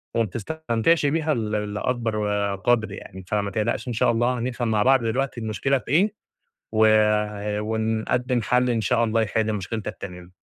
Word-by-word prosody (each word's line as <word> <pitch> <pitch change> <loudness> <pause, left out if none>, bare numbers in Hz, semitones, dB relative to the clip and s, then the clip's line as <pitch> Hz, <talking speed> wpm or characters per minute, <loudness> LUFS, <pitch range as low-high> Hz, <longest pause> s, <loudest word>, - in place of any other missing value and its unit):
وما 115 - +3
بتستمتعش 120 - 0
بيها 155 +2 +1
ل 105 -3 -2
لأكبر 105 -3 -1
قدر 110 +2 +1
يعني، 95 -1 -9
فما 100 -1 -1
تقلقش 110 +5 -1
إن 120 - -2
شاء 110 - +3
الله 120 +2 +1
هنفهم 120 0 -2
مع 105 -2 +2
بعض 135 +1 +5
دلوقتي 125 +2 -1
المشكلة 110 +5 0
في 125 - -11
إيه، 195 +8 +3 0.6
و 110 0 +4 0.7
ونقدّم 110 +3 0
حل 125 +3 +2
إن 115 -2 +1
شاء 115 +3 +2
الله 115 0 +1
يحل 110 0 0
مشكلتك 105 +1 -4
تمامًا، 90 -2 -9
115 Hz, 160 wpm, -24 LUFS, 105-125 Hz, 0.7 s, بعض